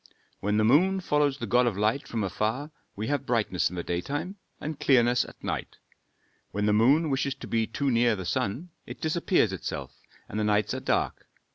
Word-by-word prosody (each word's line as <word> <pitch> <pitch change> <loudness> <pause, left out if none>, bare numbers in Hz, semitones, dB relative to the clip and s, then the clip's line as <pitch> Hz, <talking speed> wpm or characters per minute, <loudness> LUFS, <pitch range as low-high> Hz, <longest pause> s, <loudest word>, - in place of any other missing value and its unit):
When 105 +1 0
the 110 - +3
moon 180 - +4
follows 150 -5 +1
the - - -4
god 125 0 +3
of 105 -5 -1
light 110 +6 0
from 115 -3 -2
afar, 110 - -2 0.2
we 105 - -3
have 145 +2 -2
brightness 110 -7 +1
in 90 - -8
the 85 - -3
daytime 145 - -3 0.2
and 155 -1 -5
clearness 120 -2 +4
at - - -14
night. - - -4 0.7
When 105 +2 -2
the 105 - +3
moon 140 +9 +4
wishes 135 0 0
to - - -9
be 115 -1 0
too 140 +4 -1
near 120 -1 +3
the 95 -2 -6
sun, 100 - -2 0.2
it - - -8
disappears 160 - +1
itself 95 - -5 0.4
and 105 - -4
the - - +1
nights 105 0 +1
are - - -2
dark. - - -1
120 Hz, 200 wpm, -27 LUFS, 105-145 Hz, 0.7 s, moon